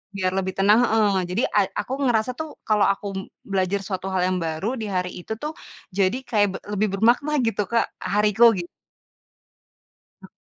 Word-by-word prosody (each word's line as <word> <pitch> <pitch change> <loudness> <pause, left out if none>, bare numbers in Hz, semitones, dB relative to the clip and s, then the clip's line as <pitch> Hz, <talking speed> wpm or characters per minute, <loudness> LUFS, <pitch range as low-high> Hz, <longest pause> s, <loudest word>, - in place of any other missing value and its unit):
biar 185 -1 0
lebih 190 -1 -1
tenang 205 +4 +5
heeh, 205 -5 +2
jadi 215 +8 0
a - - +7 0.2
aku 260 - -3
ngerasa 230 +1 +1
tuh 315 -1 -5
kalau 210 -2 +3
aku 200 +1 0
m - - -2 0.3
belajar 195 +1 0
suatu 190 -1 -4
hal 185 - +1
yang 185 0 0
baru 185 +11 -2
di - - -3
hari 180 -1 -1
itu 220 - -5
tuh, 305 +1 -3 0.4
jadi 195 +5 +1
kayak 205 -4 +3
be - - -2 0.2
lebih 210 +1 +1
bermakna 250 +6 +3
gitu, 210 -2 0
Kak, 230 - +3 0.2
hariku, 210 +3 +4
gi - - -1 1.6
He - - -12
205 Hz, 180 wpm, -23 LUFS, 190-225 Hz, 1.6 s, a